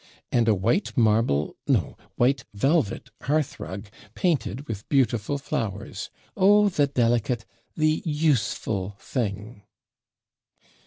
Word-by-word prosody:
And 120 Hz, -2 st, +2 dB
a 110 Hz, -, +5 dB
white 120 Hz, -, 0 dB
marble 110 Hz, -, +2 dB
no! -, -, +1 dB, 0.2 s
white 130 Hz, +3 st, +2 dB
velvet 130 Hz, -, +1 dB
hearthrug, 130 Hz, -9 st, -2 dB, 0.3 s
painted 140 Hz, -, -1 dB
with 105 Hz, -3 st, -6 dB
beautiful 130 Hz, -2 st, +1 dB
flowers 105 Hz, -7 st, -4 dB, 0.3 s
oh, 205 Hz, +2 st, +5 dB
the 145 Hz, -6 st, +2 dB
delicate, 120 Hz, -3 st, +1 dB, 0.3 s
the 155 Hz, 0 st, +2 dB
USEFUL 115 Hz, -, 0 dB
thing!' 105 Hz, -1 st, -4 dB
120 Hz, 100 wpm, -25 LUFS, 105-145 Hz, 0.3 s, a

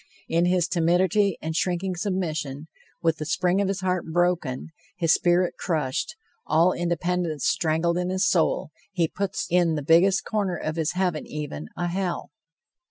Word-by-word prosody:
In 170 Hz, +1 st, +2 dB
his 180 Hz, -1 st, +2 dB
timidity 180 Hz, +3 st, +2 dB
and 160 Hz, 0 st, -3 dB
shrinking 180 Hz, +2 st, 0 dB
submission, 160 Hz, -7 st, -3 dB, 0.4 s
with 165 Hz, -1 st, +2 dB
the 155 Hz, -, -4 dB
spring 185 Hz, +1 st, +1 dB
of 200 Hz, -, +1 dB
his 195 Hz, -1 st, -2 dB
heart 185 Hz, -1 st, 0 dB
broken, 175 Hz, -6 st, 0 dB, 0.3 s
his 165 Hz, -3 st, +3 dB
spirit 175 Hz, +1 st, +2 dB
crushed, 155 Hz, -, -1 dB, 0.3 s
all 165 Hz, +4 st, +4 dB
independence 175 Hz, -3 st, -1 dB
strangled 170 Hz, +2 st, +1 dB
in 180 Hz, 0 st, -1 dB
his 185 Hz, 0 st, +1 dB
soul, 160 Hz, -2 st, +1 dB, 0.2 s
he 175 Hz, -4 st, +1 dB
puts 195 Hz, +3 st, -3 dB
in 175 Hz, -2 st, +3 dB
the 150 Hz, -, -3 dB
biggest 175 Hz, +6 st, +4 dB
corner 200 Hz, -5 st, -1 dB
of 155 Hz, 0 st, -3 dB
his 160 Hz, -2 st, -1 dB
heaven 180 Hz, -4 st, -1 dB
even, 145 Hz, -, -5 dB
a 175 Hz, -, -1 dB
hell! 180 Hz, -2 st, -3 dB
175 Hz, 160 wpm, -25 LUFS, 160-185 Hz, 0.4 s, all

